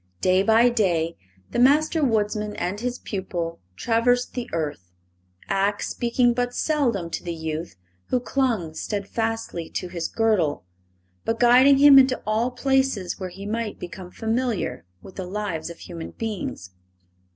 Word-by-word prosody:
Day 185 +1 +4
by 225 +4 +5
day 175 -8 +1 0.4
the - - -1
Master 305 +5 +4
Woodsman 210 -3 0
and 185 +3 -3
his 245 +1 -2
pupil 175 -4 -4 0.2
traversed 245 - +1
the 245 -2 -4
earth, 145 - -3 0.6
Ak 200 +1 0
speaking 240 0 +1
but 245 0 -2
seldom 235 - 0
to - - -4
the 170 -1 -4
youth 160 - -5 0.3
who 250 - +1
clung 235 -10 -1
steadfastly 210 -1 -3
to 180 - -4
his 170 -2 -3
girdle, 195 - +1 0.6
but 225 0 -1
guiding 255 +3 +6
him 280 -1 +9
into 260 -1 +3
all 220 +3 +1
places 260 -7 0
where 185 -1 -4
he 195 +3 -9
might 220 0 -3
become 180 +1 -8
familiar 225 - -2 0.2
with - - -13
the 190 -2 -4
lives 185 -5 -3
of 170 - -9
human 165 -1 -8
beings. 205 - -5
215 Hz, 145 wpm, -24 LUFS, 180-245 Hz, 0.6 s, him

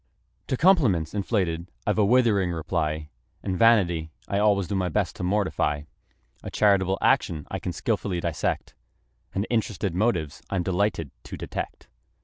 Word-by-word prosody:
To 130 - -1
compliments 125 - +3
inflated 95 -5 -1 0.2
I've - - +1
a - - +5
withering 110 -5 +3
reply; 80 -2 -2 0.3
And 95 - -1
vanity 90 -7 +4 0.2
I 100 - 0
always 100 -3 +3
do 100 - -3
my 95 -2 0
best 80 - -1
to - - -5
mortify; 90 -6 0 0.6
A - - -6
charitable 95 -2 +3
action 75 -3 +2
I - - -2
can 90 - -3
skilfully 100 -1 -1
dissect: 85 -2 -2 0.6
And 100 +2 0
interested 105 -5 0
motives 90 -7 0
I'm 95 -3 0
delighted 90 -5 0
to - - -7
detect. - - -6
95 Hz, 145 wpm, -26 LUFS, 85-105 Hz, 0.6 s, a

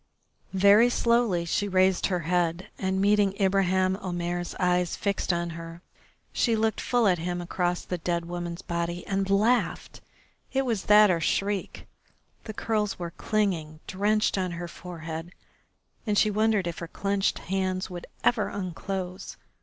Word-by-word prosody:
Very 200 +5 +6
slowly 235 -8 +2
she 205 +4 0
raised 185 -1 +3
her 180 -3 -1
head, 175 +3 0
and, 190 0 0
meeting 200 0 +2
Ibraheim 190 -1 +2
Omair's 175 -2 -3
eyes 180 -2 +1
fixed 200 -2 -1
on 170 0 -2
her, 165 +1 -9 0.5
she 230 -2 +2
looked 220 0 0
full 240 -3 +2
at 180 -3 +2
him 175 +1 -3
across 175 0 -2
the 180 - -3
dead 170 0 -1
woman's 175 0 -5
body 170 0 -3
and 195 0 -1
laughed! 220 +5 +1 0.5
It 270 0 +1
was 225 -6 -1
that 210 -1 +7
or 170 -2 0
shriek. 200 +4 -1 0.6
The 215 - -6
curls 215 -3 -1
were 170 -1 -5
clinging 175 -7 -1
drenched 205 +1 +1
on 185 -2 -2
her 175 +1 -5
forehead, 165 -1 -7 0.7
and 210 -1 +1
she 215 - +4
wondered 215 -2 +2
if 170 -1 -4
her 170 - -5
clenched 200 +3 -1
hands 185 0 -2
would 175 -1 -7 0.2
ever 225 -4 +2
unclose. 185 0 -5
185 Hz, 150 wpm, -27 LUFS, 175-205 Hz, 0.7 s, that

